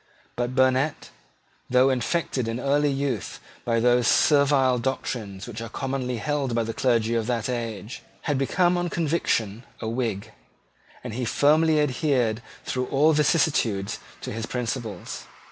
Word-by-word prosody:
But 120 +1 -2
Burnet, 130 +3 +1 0.6
though 130 +2 +4
infected 130 -1 -1
in 115 +2 -2
early 145 +2 +2
youth 135 -6 -2 0.2
by 115 -1 +1
those 120 +1 +3
servile 140 -4 +4
doctrines 115 -6 -3
which 115 -2 -7
were 115 - -6
commonly 130 -1 -3
held 140 -2 -1
by 115 - +2
the 115 0 -4
clergy 115 -3 +1
of 115 -1 0
that 120 -3 -1
age, 115 -3 -4 0.2
had 145 -4 -1
become 175 +6 +2
on 175 0 -1
conviction 140 -11 0 0.2
a - - -4
Whig; 115 -4 -2 0.7
and 125 -3 -6
he 125 +2 -3
firmly 155 +5 +3
adhered 125 -5 +1 0.2
through 125 -1 -2
all 150 +4 +4
vicissitudes 145 - +1 0.2
to - - -5
his 115 +1 -4
principles. 115 -5 -4
125 Hz, 145 wpm, -25 LUFS, 115-140 Hz, 0.7 s, though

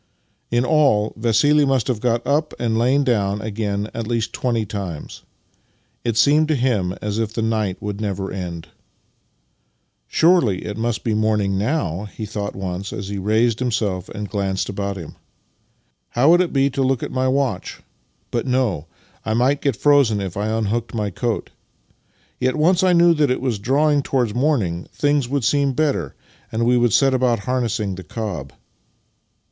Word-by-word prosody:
In 120 +1 +1
all, 130 -9 +3
Vassili 125 +7 +3
must 135 -5 +1
have 125 -5 -1
got 120 -1 0
up 150 +2 0
and 115 -2 -1
lain 130 +5 +3
down 105 -6 +1
again 105 -1 -3
at 115 -2 -4
least 115 -2 -1
twenty 115 -3 -1
times. 95 -6 -6 0.8
It 115 -2 -1
seemed 150 +6 +4
to 155 - +1
him 110 -9 0
as 105 +1 -2
if 110 -2 -1
the 115 - -1
night 110 -4 -1
would 105 0 -4
never 100 -2 -3
end. 90 -3 -6 0.7
" - - -47
Surely 160 - +3
it 105 - -4
must 115 +1 -2
be 115 - 0
nearly 110 0 +1
morning 105 -3 +1
now? 105 - -1
" 105 - -14
he 110 - -4
thought 105 -1 -4
once 95 0 -4
as 100 -1 -5
he 100 -1 -3
raised 110 +3 +1
himself 110 -7 -1
and 105 -1 -5
glanced 95 -2 -2
about 100 0 -3
him. 85 -4 -9 0.5
" - - -45
How 140 +6 +6
would 175 +1 +6
it 180 - -1
be 140 0 +2
to 135 - -2
look 130 -2 +1
at - - -4
my 130 0 0
watch? 130 -8 -1 0.5
But 120 +2 -2
no; 125 - 0 0.4
I 110 - -1
might 130 +4 +2
get 140 -5 +1
frozen 140 -6 +3
if 95 -3 -4
I 105 +1 -2
unhooked 110 +2 -1
my 105 -2 -1
coat. 115 +3 -3 0.9
Yet, 130 0 +1
once 170 +4 +3
I 185 -1 +4
knew 170 0 +6
that 150 -3 +2
it 125 - 0
was 120 -5 -2
drawing 145 +6 +2
towards 125 -6 0
morning, 115 - 0
things 145 -4 +1
would 140 -1 -1
seem 140 +2 +2
better, 135 - -1 0.4
and 115 +1 0
we 125 +1 +4
would 120 -1 +3
set 135 +5 +4
about 125 -4 +1
harnessing 115 -4 -1
the 95 0 -8
cob." 90 - -5
115 Hz, 180 wpm, -21 LUFS, 100-130 Hz, 0.9 s, How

